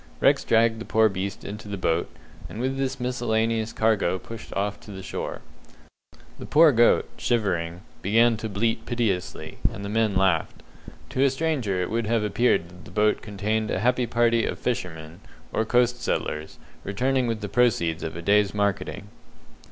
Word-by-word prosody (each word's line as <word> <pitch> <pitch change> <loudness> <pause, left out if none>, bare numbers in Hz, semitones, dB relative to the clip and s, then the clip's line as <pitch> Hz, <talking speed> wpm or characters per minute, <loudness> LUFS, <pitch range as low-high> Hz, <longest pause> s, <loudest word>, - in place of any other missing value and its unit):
Rex - - +4
dragged 115 0 +3
the - - -6
poor 110 0 +4
beast 100 0 -5
into 105 +1 -7
the 100 -1 -4
boat, 85 -2 0 0.4
and 110 - -8
with 130 +2 -1
this 135 0 -2
miscellaneous 115 -2 0
cargo 110 -5 +1
pushed 115 +4 -10
off 100 +1 -1
to - - -15
the 95 -1 -8
shore. - - -5 1.0
The - - -7
poor 155 0 +6
goat, 120 -2 +4
shivering, 90 -7 -1 0.2
began 115 +4 +4
to 110 0 -5
bleat 115 +3 -1
piteously, 110 -7 -2
and 100 - -7
the - - -4
men 110 -3 +2
laughed. 95 -4 +1 0.5
To 130 - -1
a 140 - +5
stranger 135 - -1
it - - -4
would 115 -1 -1
have 115 -1 +1
appeared 105 -4 +2
that 90 +1 -15
the - - -11
boat 105 +3 +2
contained 105 +1 -2
a - - 0
happy 125 +4 +1
party 115 0 +2
of - - -2
fishermen, 85 -9 -4 0.3
or 110 - +1
coast 120 +1 +2
settlers, 75 0 -3 0.3
returning 130 +5 0
with 115 -1 -2
the 105 - -3
proceeds 100 -7 +1
of 80 -1 -5
a 85 - -6
day's 105 +1 +3
marketing. 100 -2 -1
110 Hz, 175 wpm, -25 LUFS, 95-120 Hz, 1.0 s, poor